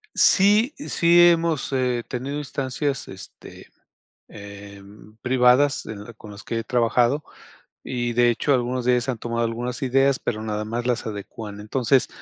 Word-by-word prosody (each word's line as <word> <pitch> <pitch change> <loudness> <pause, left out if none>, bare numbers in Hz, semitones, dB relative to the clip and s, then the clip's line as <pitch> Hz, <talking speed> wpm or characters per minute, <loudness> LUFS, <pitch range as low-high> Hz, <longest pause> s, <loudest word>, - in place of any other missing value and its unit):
Sí, 210 +7 +4
sí, 170 0 +4
hemos, 165 -4 0
eh, 125 -3 0
tenido 135 +4 -4
instancias, 135 -1 -3
este, - - -11 0.6
em, 100 +1 -13
privadas 130 +2 +3
en 105 -2 -7
con 105 - -12
las 100 0 -11
que 115 - -3
he - - -7
trabajado 125 +4 +1 0.6
y 120 -2 -3
de 120 0 +4
hecho, 130 +5 0
algunos 125 0 -1
de 125 - +3
ellos 125 +1 0
han 125 -3 -2
tomado 115 +1 -2
algunas 120 +3 -4
ideas, 135 +1 +2
pero 110 -1 -4
nada 105 -1 -3
más 115 +3 -4
las 125 -2 -1
adecúan. 105 0 -7
Entonces, 125 +4 +1
120 Hz, 150 wpm, -23 LUFS, 110-135 Hz, 0.6 s, Sí